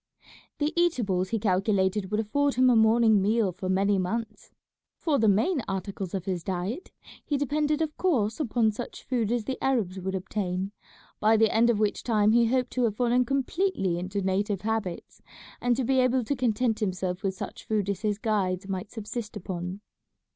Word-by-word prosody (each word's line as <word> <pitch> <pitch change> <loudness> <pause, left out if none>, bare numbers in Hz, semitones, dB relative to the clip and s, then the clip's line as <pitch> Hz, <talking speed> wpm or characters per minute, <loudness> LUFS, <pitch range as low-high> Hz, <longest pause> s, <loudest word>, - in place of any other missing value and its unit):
The 300 +2 0
eatables 225 - +1
he 225 - 0
calculated 195 -1 +1
would 210 +1 0
afford 280 +6 +1
him 255 0 +5
a - - +4
morning 220 -1 +5
meal 210 0 +2
for 185 +1 -5
many 195 +1 +2
months 215 +3 -4 0.5
for 300 -4 +1
the 220 - +3
main 255 - +2
articles 195 -1 -4
of 185 -2 -4
his 180 -3 -2
diet, 195 - -3 0.3
he 290 - -1
depended 295 +2 0
of 310 -1 -4
course 235 - +1
upon 235 -5 +2
such 230 +3 -7
food 235 -4 -1
as 240 -2 0
the 260 +3 -5
Arabs 215 -9 0
would 190 +1 -3
obtain 190 0 -3 0.5
by 220 +1 +4
the 220 0 +3
end 230 +2 +4
of 235 - +3
which 210 -1 0
time 215 -3 +2
he 235 0 +4
hoped 255 +1 0
to 250 -1 +1
have 215 -3 -1
fallen 245 +1 +2
completely 275 - 0
into 190 +2 -3
native 195 +1 0
habits, 215 -5 -3 0.4
and 245 0 +2
to 265 - -1
be 265 +2 +2
able 255 0 +2
to 285 +6 -1
content 240 -2 0
himself 185 -2 -2
with 195 -2 -1
such - - -8
food 210 -3 0
as 200 -1 -2
his 210 -2 0
guides 195 -4 -1
might 190 0 -4
subsist 220 0 -6
upon. 180 +2 -5
215 Hz, 185 wpm, -27 LUFS, 195-245 Hz, 0.5 s, him